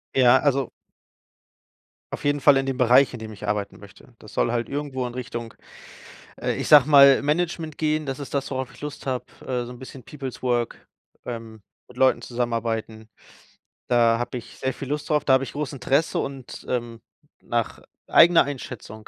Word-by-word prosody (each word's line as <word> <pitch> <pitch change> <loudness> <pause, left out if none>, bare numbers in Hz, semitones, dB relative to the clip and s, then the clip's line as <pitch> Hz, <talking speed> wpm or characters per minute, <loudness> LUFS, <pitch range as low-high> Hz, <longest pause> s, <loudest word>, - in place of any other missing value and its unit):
Ja, 130 0 +6
also 140 -3 0 1.4
auf - - -6
jeden 145 0 +1
Fall 140 0 +6
in 135 - 0
dem 135 -1 -2
Bereich, 125 +2 +5
in 120 - -7
dem 110 0 -8
ich 100 - -9
arbeiten 105 -1 -2
möchte. 100 +4 -16
Das 110 - -14
soll - - +1
halt 120 -1 -2
irgendwo 140 -3 -3
in 120 - -8
Richtung, 120 -2 -6 0.9
äh, - - -1
ich - - -3
sage 150 -2 +8
mal, 140 -2 +8
Management 160 +1 -1
gehen. 155 -1 0
Das 135 0 -4
ist 140 - -8
das, 140 -1 -2
worauf 130 -1 -3
ich - - -16
Lust 150 -1 -7
habe, 130 -1 -2 0.2
äh, 125 -2 -3
so 120 - -9
'n 125 - -11
bisschen 130 0 -11
Peoples 135 0 -8
Work, 120 -2 -1 0.4
ähm, 115 -3 -7 0.3
mit 125 - -17
Leuten 130 0 +3
zusammenarbeiten. 115 -2 -3 0.8
Da 115 -1 +3
habe 120 +1 -3
ich 115 - -14
sehr 130 -1 -1
viel 135 - -8
Lust 150 +2 -3
drauf. 150 -1 +1
Da 130 - +4
habe 130 - +4
ich - - -10
groß 145 -1 -4
Interesse 140 +4 0
und, 135 -3 -6
ähm, 120 -2 -3 0.4
nach - - -2 0.3
eigener 170 0 +6
Einschätzung 125 -6 -8
130 Hz, 185 wpm, -24 LUFS, 120-140 Hz, 1.4 s, sage